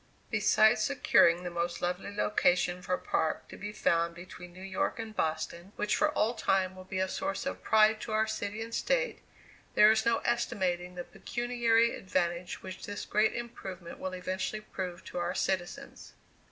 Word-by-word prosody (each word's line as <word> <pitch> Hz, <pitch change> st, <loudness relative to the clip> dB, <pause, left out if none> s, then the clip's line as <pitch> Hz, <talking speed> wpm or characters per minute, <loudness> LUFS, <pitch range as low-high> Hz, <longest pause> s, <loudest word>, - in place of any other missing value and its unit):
Besides 220 Hz, +1 st, +4 dB
securing 275 Hz, -, +4 dB
the 175 Hz, -, -4 dB
most 170 Hz, 0 st, -2 dB
lovely 180 Hz, +3 st, -2 dB
location 180 Hz, -3 st, +2 dB
for 180 Hz, -, 0 dB
a -, -, -5 dB
park 160 Hz, -, -1 dB
to -, -, -9 dB
be 205 Hz, +2 st, -6 dB
found 170 Hz, -4 st, +1 dB
between 175 Hz, 0 st, -10 dB
New 185 Hz, +2 st, -11 dB
York 190 Hz, -1 st, -1 dB
and 220 Hz, -1 st, -6 dB
Boston, 170 Hz, +4 st, -2 dB
which 210 Hz, 0 st, 0 dB
for 310 Hz, +1 st, +3 dB
all 225 Hz, +3 st, +2 dB
time 190 Hz, -4 st, +1 dB
will 185 Hz, 0 st, -11 dB
be 190 Hz, 0 st, -5 dB
a 190 Hz, 0 st, +1 dB
source 285 Hz, +10 st, -3 dB
of 275 Hz, -, -4 dB
pride 215 Hz, 0 st, +4 dB
to 225 Hz, -, -5 dB
our 215 Hz, 0 st, +3 dB
city 220 Hz, 0 st, -3 dB
and 230 Hz, 0 st, -9 dB
State, -, -, 0 dB, 0.5 s
there 210 Hz, +1 st, +8 dB
is 220 Hz, 0 st, +2 dB
no 235 Hz, 0 st, +3 dB
estimating 180 Hz, -7 st, 0 dB
the 175 Hz, -, -4 dB
pecuniary 235 Hz, +2 st, +1 dB
advantage 175 Hz, -2 st, -2 dB
which 185 Hz, 0 st, -7 dB
this 205 Hz, -, -5 dB
great 215 Hz, +1 st, +2 dB
improvement 190 Hz, -7 st, -7 dB
will 185 Hz, 0 st, -4 dB
eventually 185 Hz, +3 st, -3 dB
prove 185 Hz, -4 st, -6 dB
to -, -, -5 dB
our 175 Hz, +1 st, -1 dB
citizens. 185 Hz, -2 st, -3 dB
195 Hz, 180 wpm, -30 LUFS, 180-220 Hz, 0.5 s, there